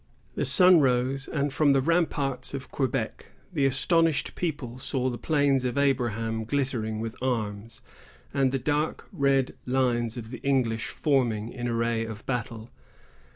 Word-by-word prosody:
The -, -, -1 dB
sun 180 Hz, -2 st, +7 dB
rose, 130 Hz, 0 st, +1 dB
and, 145 Hz, -2 st, -1 dB
from 145 Hz, -1 st, +4 dB
the 135 Hz, -, +4 dB
ramparts 140 Hz, -5 st, 0 dB
of 135 Hz, -, -7 dB
Quebec, 120 Hz, -5 st, -3 dB, 0.2 s
the 140 Hz, -5 st, +2 dB
astonished 160 Hz, +4 st, +2 dB
people 140 Hz, -8 st, -4 dB
saw 130 Hz, -1 st, -1 dB
the 120 Hz, -, -6 dB
Plains 145 Hz, -4 st, +2 dB
of 125 Hz, +1 st, -2 dB
Abraham 115 Hz, -5 st, 0 dB
glittering 120 Hz, -4 st, -1 dB
with 115 Hz, +1 st, -4 dB
arms, 115 Hz, -3 st, -3 dB, 0.5 s
and 135 Hz, -2 st, +2 dB
the 135 Hz, -, 0 dB
dark 150 Hz, +4 st, -1 dB
red 135 Hz, -2 st, +2 dB
lines 125 Hz, -2 st, 0 dB
of 115 Hz, -1 st, -7 dB
the 125 Hz, -, -6 dB
English 125 Hz, -5 st, 0 dB
forming 120 Hz, -6 st, 0 dB
in 120 Hz, -1 st, -4 dB
array 115 Hz, -1 st, 0 dB
of 110 Hz, -1 st, -8 dB
battle. 115 Hz, -2 st, -4 dB
130 Hz, 150 wpm, -27 LUFS, 115-140 Hz, 0.5 s, sun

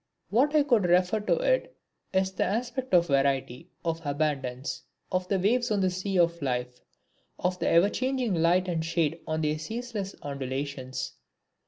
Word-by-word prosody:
What 275 Hz, +8 st, +3 dB
I 300 Hz, -, +6 dB
would 240 Hz, -9 st, +3 dB
refer 180 Hz, +4 st, +3 dB
to -, -, +1 dB, 0.4 s
is 190 Hz, 0 st, +1 dB
the 190 Hz, -, 0 dB
aspect 245 Hz, +5 st, -2 dB
of 170 Hz, -1 st, +5 dB
variety, 135 Hz, +1 st, 0 dB, 0.2 s
of 165 Hz, 0 st, -1 dB
abundance, 140 Hz, -3 st, -2 dB, 0.3 s
of 185 Hz, 0 st, 0 dB
the 195 Hz, -, +1 dB
waves 235 Hz, +6 st, +2 dB
on 210 Hz, -2 st, +1 dB
the 185 Hz, -1 st, +2 dB
sea 185 Hz, +1 st, -2 dB
of 170 Hz, -1 st, +2 dB
life, 125 Hz, -2 st, -2 dB, 0.6 s
of 180 Hz, 0 st, -1 dB
the -, -, 0 dB
ever 170 Hz, +4 st, +5 dB
changing 255 Hz, -4 st, 0 dB
light 175 Hz, +2 st, +3 dB
and 165 Hz, -3 st, -1 dB
shade 165 Hz, -1 st, 0 dB
on 155 Hz, 0 st, -1 dB
their 155 Hz, 0 st, 0 dB
ceaseless 220 Hz, 0 st, -5 dB
undulations. 135 Hz, -1 st, -4 dB
180 Hz, 160 wpm, -28 LUFS, 150-210 Hz, 0.6 s, I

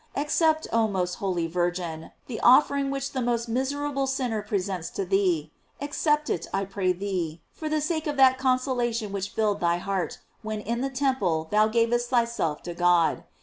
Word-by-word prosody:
Accept, 315 Hz, +2 st, +1 dB
oh 225 Hz, -1 st, +3 dB
most 180 Hz, -3 st, -1 dB
holy 180 Hz, -4 st, 0 dB
Virgin, 175 Hz, -1 st, -2 dB, 0.2 s
the 230 Hz, -4 st, -5 dB
offering 280 Hz, +2 st, +5 dB
which 275 Hz, 0 st, -3 dB
the 260 Hz, -, -2 dB
most 235 Hz, -1 st, 0 dB
miserable 275 Hz, +3 st, -1 dB
sinner 250 Hz, -5 st, -1 dB
presents 195 Hz, -4 st, -3 dB
to 195 Hz, -, -3 dB
thee; 180 Hz, -5 st, +1 dB, 0.3 s
ac 285 Hz, +1 st, -5 dB
cept 300 Hz, -1 st, +1 dB
it, -, -, -2 dB
I 195 Hz, 0 st, -1 dB
pray 195 Hz, -1 st, 0 dB
thee, 180 Hz, -4 st, -3 dB
for 310 Hz, -, -5 dB
the 305 Hz, 0 st, 0 dB
sake 315 Hz, 0 st, -1 dB
of 295 Hz, -1 st, -2 dB
that 260 Hz, -1 st, +5 dB
conso 255 Hz, 0 st, +1 dB
lation 235 Hz, -3 st, -1 dB
which 200 Hz, 0 st, -3 dB
filled 210 Hz, -2 st, 0 dB
thy 170 Hz, 0 st, +2 dB
heart 185 Hz, -2 st, -2 dB, 0.2 s
when 215 Hz, -1 st, -4 dB
in 235 Hz, +3 st, -3 dB
the 270 Hz, -, -1 dB
temple 250 Hz, -, 0 dB
thou 215 Hz, +1 st, +4 dB
gavest 235 Hz, +2 st, +1 dB
thyself 235 Hz, -11 st, 0 dB
to 175 Hz, -, -5 dB
God. 175 Hz, -1 st, +2 dB
220 Hz, 185 wpm, -26 LUFS, 185-265 Hz, 0.3 s, offering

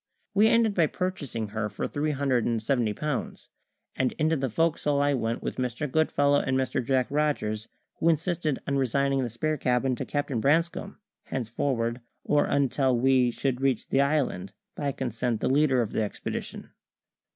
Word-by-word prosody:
We 205 Hz, +2 st, +5 dB
ended 225 Hz, -2 st, +3 dB
by 170 Hz, -5 st, +3 dB
purchasing 145 Hz, -, -3 dB
her 105 Hz, 0 st, -2 dB
for 105 Hz, -, -3 dB
three 150 Hz, +1 st, -2 dB
hundred 135 Hz, -4 st, +1 dB
and 115 Hz, -1 st, 0 dB
seventy 120 Hz, -3 st, 0 dB
pounds; 150 Hz, +4 st, -4 dB, 0.5 s
and 130 Hz, -1 st, 0 dB
into 155 Hz, +1 st, +1 dB
the 135 Hz, -3 st, -1 dB
fo'c's'le 150 Hz, +1 st, +1 dB
I 145 Hz, 0 st, +3 dB
went 115 Hz, -3 st, -2 dB
with -, -, -4 dB
Mr. 125 Hz, +3 st, -2 dB
Goodfellow 145 Hz, -1 st, +2 dB
and 130 Hz, 0 st, 0 dB
Mr. 130 Hz, -1 st, 0 dB
Jack 130 Hz, +1 st, +2 dB
Rogers, 140 Hz, -8 st, 0 dB, 0.3 s
who 165 Hz, -, +3 dB
insisted 160 Hz, -2 st, 0 dB
on 140 Hz, -, +1 dB
resigning 135 Hz, +1 st, +1 dB
the 125 Hz, -, -2 dB
spare 155 Hz, +7 st, -1 dB
cabin 125 Hz, 0 st, +1 dB
to -, -, -3 dB
Captain 145 Hz, -5 st, -1 dB
Branscome 165 Hz, -, +1 dB, 0.3 s
henceforward, 120 Hz, -1 st, -2 dB, 0.2 s
or 145 Hz, 0 st, +2 dB
until 135 Hz, -2 st, +1 dB
we 130 Hz, 0 st, +4 dB
should 130 Hz, +1 st, -2 dB
reach 135 Hz, -4 st, 0 dB
the 135 Hz, -, +3 dB
island, 135 Hz, -10 st, 0 dB, 0.2 s
by 145 Hz, -2 st, -1 dB
consent 120 Hz, -3 st, -2 dB
the -, -, 0 dB
leader 135 Hz, -3 st, +3 dB
of 110 Hz, -, -6 dB
the -, -, 0 dB
expedition. 105 Hz, -, -5 dB
135 Hz, 170 wpm, -27 LUFS, 120-150 Hz, 0.5 s, We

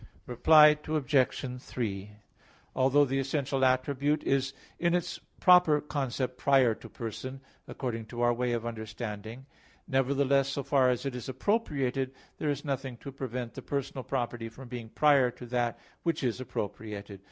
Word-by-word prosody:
Reply 150 Hz, +4 st, +6 dB
Obj. 135 Hz, -4 st, 0 dB
3: 105 Hz, -6 st, -4 dB, 0.6 s
Although 135 Hz, +2 st, +4 dB
the 135 Hz, 0 st, -1 dB
essential 135 Hz, 0 st, -1 dB
attribute 135 Hz, +3 st, +2 dB
is 135 Hz, 0 st, +1 dB, 0.3 s
in 170 Hz, 0 st, +2 dB
its 175 Hz, -, -2 dB, 0.2 s
proper 180 Hz, -5 st, +6 dB
concept 130 Hz, -3 st, -3 dB
prior 135 Hz, -4 st, +4 dB
to -, -, -12 dB
person, 120 Hz, +4 st, -6 dB, 0.3 s
according 115 Hz, -4 st, -4 dB
to 120 Hz, +2 st, -5 dB
our 120 Hz, 0 st, +4 dB
way 125 Hz, +1 st, -1 dB
of 115 Hz, -1 st, -2 dB
understanding; 110 Hz, +1 st, -6 dB, 0.4 s
nevertheless, 135 Hz, 0 st, +2 dB
so 140 Hz, 0 st, -2 dB
far 130 Hz, -2 st, +3 dB
as 125 Hz, +2 st, -1 dB
it 135 Hz, -, -2 dB
is 125 Hz, +1 st, -6 dB
appropriated, 135 Hz, -, -1 dB, 0.2 s
there 150 Hz, -, 0 dB
is 145 Hz, +1 st, -2 dB
nothing 135 Hz, -3 st, -3 dB
to 140 Hz, -, -8 dB
prevent 125 Hz, -3 st, -5 dB
the -, -, -7 dB
personal 140 Hz, -2 st, -3 dB
property 120 Hz, -3 st, -3 dB
from 125 Hz, +2 st, -12 dB
being 120 Hz, -2 st, -6 dB
prior 140 Hz, -1 st, +4 dB
to 125 Hz, 0 st, -10 dB
that 120 Hz, -2 st, -1 dB, 0.2 s
which 165 Hz, -4 st, -1 dB
is 125 Hz, 0 st, -1 dB
appropriated. 105 Hz, -3 st, -5 dB
130 Hz, 150 wpm, -29 LUFS, 120-140 Hz, 0.6 s, Reply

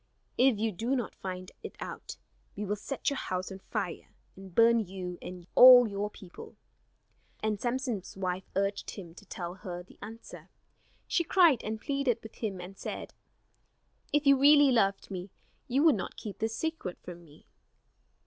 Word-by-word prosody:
If 255 Hz, -3 st, +4 dB
you 220 Hz, +1 st, 0 dB
do 230 Hz, +8 st, -1 dB
not 245 Hz, -5 st, -3 dB
find 185 Hz, -1 st, -7 dB
it -, -, -8 dB
out, -, -, -7 dB, 0.4 s
we 210 Hz, -, -4 dB
will 205 Hz, +1 st, -1 dB
set 275 Hz, +7 st, -3 dB
your 280 Hz, -, -2 dB
house 185 Hz, +1 st, -3 dB
on 190 Hz, -, -8 dB
fire, -, -, -4 dB, 0.3 s
and 190 Hz, -2 st, -12 dB
burn 230 Hz, 0 st, +6 dB
you 185 Hz, -3 st, -5 dB
and 180 Hz, -1 st, -8 dB
all 250 Hz, -1 st, +10 dB
your 205 Hz, 0 st, -3 dB
people." 190 Hz, -4 st, -12 dB, 0.9 s
And 215 Hz, -2 st, -1 dB
Samson's 245 Hz, -6 st, -3 dB
wife 185 Hz, -1 st, -3 dB
urged 195 Hz, +1 st, -1 dB
him 175 Hz, -5 st, -9 dB
to 200 Hz, +3 st, -15 dB
tell 175 Hz, -3 st, -5 dB
her 180 Hz, -1 st, -7 dB
the 185 Hz, -, -20 dB
answer. 225 Hz, +3 st, -10 dB, 0.6 s
She 340 Hz, -, +1 dB
cried 335 Hz, -, +4 dB
and 220 Hz, 0 st, -4 dB
pleaded 275 Hz, -1 st, 0 dB
with 220 Hz, -, -10 dB
him 200 Hz, -5 st, -3 dB
and 185 Hz, +2 st, -10 dB
said: -, -, -6 dB, 1.0 s
"If 295 Hz, 0 st, +2 dB
you 275 Hz, -1 st, +6 dB
really 290 Hz, 0 st, +7 dB
loved 200 Hz, -5 st, +1 dB
me, 185 Hz, 0 st, -5 dB, 0.4 s
you 265 Hz, +4 st, +2 dB
would 320 Hz, -3 st, +7 dB
not 195 Hz, -, -5 dB
keep 205 Hz, -3 st, -7 dB
this 220 Hz, 0 st, -1 dB
a -, -, -7 dB
secret 320 Hz, -, -3 dB
from 175 Hz, -1 st, -9 dB
me." 150 Hz, -2 st, -19 dB
210 Hz, 175 wpm, -30 LUFS, 185-250 Hz, 1.0 s, all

